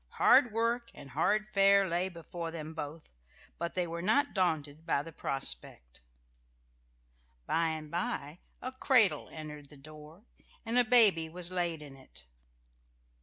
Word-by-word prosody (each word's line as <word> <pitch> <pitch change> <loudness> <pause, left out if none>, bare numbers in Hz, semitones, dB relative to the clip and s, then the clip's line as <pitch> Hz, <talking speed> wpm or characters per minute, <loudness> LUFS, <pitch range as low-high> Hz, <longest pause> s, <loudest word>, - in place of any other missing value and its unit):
Hard 245 - +5
work 230 +2 -1
and 140 -2 -12
hard 210 +10 +1
fare 195 0 +4
lay 180 +2 -1
before 170 -1 -7
them 160 -1 -8
both, 155 0 -7 0.6
but 170 0 -4
they 180 -1 0
were 170 0 -6
not 225 +10 +1
daunted 160 -5 -1
by 155 -4 -1
the 165 - -10
prospect.... 60 - -2 1.4
By 165 - 0
and 155 -1 -5
by 170 -2 -4 0.2
a 255 - -4
cradle 260 -5 +3
entered 150 -2 -9
the 145 - -16
door, 155 +5 -14 0.4
and 230 +1 -3
a - - +7
baby 215 -9 +6
was 175 +1 -4
laid 170 -4 -2
in 140 -2 -12
it.... 135 -1 -12
165 Hz, 145 wpm, -30 LUFS, 150-200 Hz, 1.4 s, a